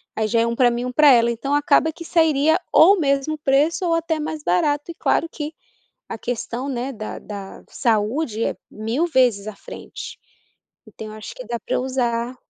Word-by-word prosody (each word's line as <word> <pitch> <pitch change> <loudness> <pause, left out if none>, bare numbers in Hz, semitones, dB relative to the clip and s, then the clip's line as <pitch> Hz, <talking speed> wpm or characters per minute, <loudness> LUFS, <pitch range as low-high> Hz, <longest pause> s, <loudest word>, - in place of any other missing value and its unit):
aí 220 -1 0
já 230 +2 +1
é 230 - +1
um 235 - -2
pra 245 0 +4
mim, 240 +1 -3
um 250 - -3
pra 295 +2 +6
ela, 235 -2 +5
então 235 +5 -2
acaba 290 +2 +3
que 335 - -9
sairia 315 -2 +3 0.2
ou 385 +5 +7
mesmo 280 0 +1
o - - -12
preço 295 +5 +1
ou 335 - +1
até 330 -1 0
mais 310 0 -4
barato, 290 - +1
e 340 - -6
claro 330 - +1
que, 300 0 -6 0.5
a - - -6
questão, 245 +3 -4
né, 260 +1 -3
da 215 -2 -6
da 200 -2 -9
saúde 230 +1 0
é - - -2 0.2
mil 225 +9 -1
vezes 250 -10 +2
à 215 - -6
frente. - - -9 0.7
Então, 220 - -9
eu 215 - -9
acho 215 0 -9
que 255 - -9
dá 235 +1 -4
pra - - -3
eu - - 0
usar 245 -2 -1
260 Hz, 205 wpm, -21 LUFS, 230-305 Hz, 0.7 s, ou